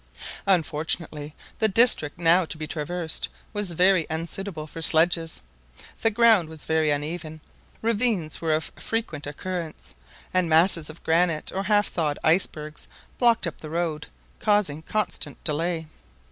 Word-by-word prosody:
Unfortunately, 155 -3 0 0.2
the 220 - +4
district 205 -8 +5
now 170 +2 +4
to 160 - -4
be 155 - -4
traversed 160 +2 -3 0.2
was 205 -2 -1
very 180 0 +3
unsuitable 165 +1 -4
for 165 +1 -9
sledges. 165 - +1 0.6
The 225 - +4
ground 220 -6 +4
was 160 -2 -6
very 160 -1 +2
uneven; 155 +2 -3 0.4
ravines 220 -8 0
were 160 -2 +2
of 155 - -3
frequent 190 -11 -3
occurrence; 165 +2 -6 0.4
and 185 -2 +2
masses 165 0 +3
of 155 - -12
granite 165 -1 +1
or 195 +1 -3
half 205 +1 +3
thawed 150 -4 -1
icebergs 155 -2 0 0.3
blocked 235 -4 +3
up 170 - -6
the 155 - -7
road, 165 -1 -2 0.3
causing 205 -8 +1
constant 215 +5 -3
delay. 165 +1 -1
165 Hz, 135 wpm, -25 LUFS, 155-190 Hz, 0.6 s, district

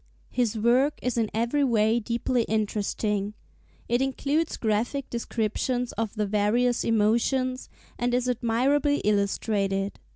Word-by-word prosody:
His 235 -3 0
work 250 +6 +3
is 250 - -1
in 225 -2 0
every 235 +6 +1
way 225 -2 +3
deeply 235 +2 0
interesting; 210 -1 -1 0.5
it 240 +2 +1
includes 280 +4 0
graphic 230 +5 -1
descriptions 235 +2 -2
of 225 -1 -3
the 210 -1 0
various 215 +4 +1
emotions, 235 +4 +1 0.3
and 245 +1 0
is 250 0 0
admirably 255 +5 +1
illustrated. 200 -1 0
235 Hz, 120 wpm, -26 LUFS, 215-250 Hz, 0.5 s, work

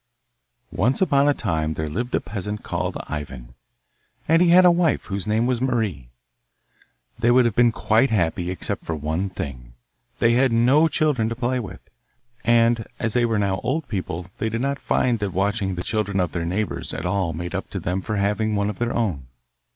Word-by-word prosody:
Once 120 +8 +1
upon 145 -6 +3
a - - +4
time 80 -6 -1
there 80 - -3
lived 120 +11 -2
a - - +2
peasant 105 0 -5
called - - -3
Ivan, 70 -5 -7 0.7
and 165 +2 +4
he 180 - +5
had 180 +2 +7
a 180 - +8
wife 170 -3 +1
whose 100 -1 -4
name 110 +2 +2
was 125 -1 0
Marie. 110 - -1 1.1
They 120 0 +2
would 125 0 +5
have 120 - +1
been 120 +1 +4
quite 115 +4 +2
happy 90 -4 0
except 90 - -3
for 80 - -3
one 80 +6 -2
thing: 60 -9 -7 0.4
they 115 - +3
had 130 +1 +3
no 130 +8 +4
children 145 -7 +1
to 115 - -3
play 125 +1 -1
with, 95 -6 -8 0.6
and 115 -1 +3
as 115 -2 -1
they 120 -1 +3
were 115 -2 0
now 100 -2 0
old 155 +4 -2
people 90 -4 -4
they 110 - 0
did 115 +1 -3
not 140 +1 -1
find 120 -3 +1
that 100 -3 -3
watching 100 0 0
the 90 - -4
children 105 -3 -1
of 90 -3 0
their 85 -1 -3
neighbours 95 +4 -3
at - - -5
all 90 -2 0
made 85 +2 -5
up - - -4
to - - -4
them 90 +2 -2
for 105 - -3
having 105 +2 0
one 100 +1 0
of 100 - -12
their 120 0 -1
own. 85 - -1
110 Hz, 200 wpm, -23 LUFS, 90-120 Hz, 1.1 s, a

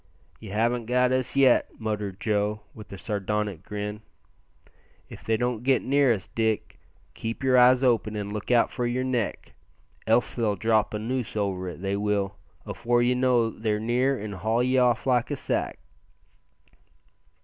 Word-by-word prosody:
"Ye 110 - -10
haven't 115 +3 0
got 125 +1 +2
us 130 0 -1
yet," 135 -3 +3
muttered 105 -3 -3
Joe, 105 0 0
with 110 - -12
a 100 - -7
sardonic 100 0 -2
grin. 105 +1 -5 1.1
"If - - -11
they 110 0 +1
get 125 +2 +1
near 140 -1 +3
us, 100 -5 -1
Dick, 110 -2 -2 0.3
keep 115 +3 -5
yer 130 -1 +3
eyes 125 +1 +6
open 115 -4 +2
an' 100 0 -4
look 105 -1 -5
out 120 -2 +3
for 125 -2 -2
yer 125 +2 -1
neck, 125 -4 -2 0.5
else 115 +2 +2
they'll 110 -4 0
drop 110 +1 +1
a - - 0
noose 120 0 -3
over 95 -3 -2
it, 90 - -9
they 100 0 -1
will, 100 -1 -1 0.3
afore 120 0 0
ye 125 +1 +3
know 125 -3 +2
they're 110 -1 -2
near, 125 +4 +1
an' 105 0 -6
haul 110 +5 0
ye 130 +1 +2
off 125 -1 +2
like 125 -2 +2
a 145 - -1
sack." - - -2
115 Hz, 165 wpm, -26 LUFS, 105-125 Hz, 1.1 s, eyes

